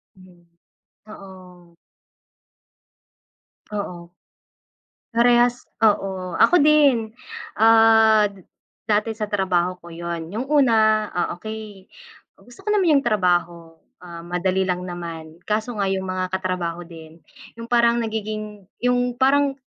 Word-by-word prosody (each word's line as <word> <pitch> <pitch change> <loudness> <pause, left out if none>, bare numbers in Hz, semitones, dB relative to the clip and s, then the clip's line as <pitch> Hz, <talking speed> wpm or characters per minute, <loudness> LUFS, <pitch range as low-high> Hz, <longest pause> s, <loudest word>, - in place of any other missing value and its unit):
Mm, 180 -2 -20 0.7
oo. 180 -3 -14 2.0
Oo. 175 -4 -6 1.0
Parehas 240 +1 +3 0.2
oo, 190 -4 0
ako 355 - +5
din. 280 -7 +3 0.4
Ah, 220 -1 +5
d 195 -3 -17 0.4
dati 215 +1 +1
sa 215 -1 -5
trabaho 185 -3 0
ko - - -10
yun, 170 0 -6
yung 245 +6 -4
una, 220 -7 +3
ah, 175 -1 -2
okey, 215 -1 -9 0.6
gusto 245 - -17
ko - - -5
naman 360 -8 +3
yung 275 - +1
trabaho, 175 -6 -1 0.2
ah, 170 -1 -10
madali 185 +2 -1
lang 180 -1 -2
naman. 165 -3 -8
Kaso 215 +2 -2
nga 200 - -1
yung 190 0 -3
mga 185 0 -3
katrabaho 180 -2 -3
din, 165 -1 -13 0.4
yung 230 0 -9
parang 235 0 +3
nagiging 215 -2 -5 0.2
yung 245 0 +1
parang 275 +1 +2
205 Hz, 115 wpm, -22 LUFS, 180-230 Hz, 2.0 s, ako